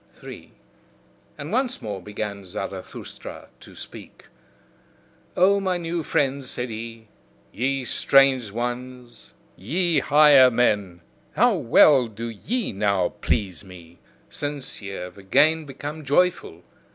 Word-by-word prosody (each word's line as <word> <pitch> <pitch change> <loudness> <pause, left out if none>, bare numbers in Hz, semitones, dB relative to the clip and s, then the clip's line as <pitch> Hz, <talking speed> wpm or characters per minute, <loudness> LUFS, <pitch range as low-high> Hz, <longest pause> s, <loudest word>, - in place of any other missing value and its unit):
3. - - -12 0.8
And 150 +3 -7
once 255 +2 0
more 100 -3 -6
began 100 +1 -6
Zarathustra 90 - -8
to - - -15
speak. - - -11 1.1
"O 195 +3 +4
my 185 -2 -1
new 170 0 -3
friends," 140 -3 -1
said 125 0 -3
he, 115 0 -8 0.4
"ye 135 +2 -2
strange 135 -2 +3
ones, 120 - -6 0.2
ye 165 - 0
higher 145 -2 +6
men, 105 -7 0 0.3
how - - +4
well 130 +2 +5
do 115 +2 -7
ye 215 - -3
now 100 -3 0
please 85 +4 -1
me, 90 -3 -14 0.3
Since 145 -4 -5
ye 100 - -7
have 95 0 -8
again 150 +11 +3
become 145 +3 -7
joyful! 145 - 0
125 Hz, 115 wpm, -23 LUFS, 100-150 Hz, 1.1 s, higher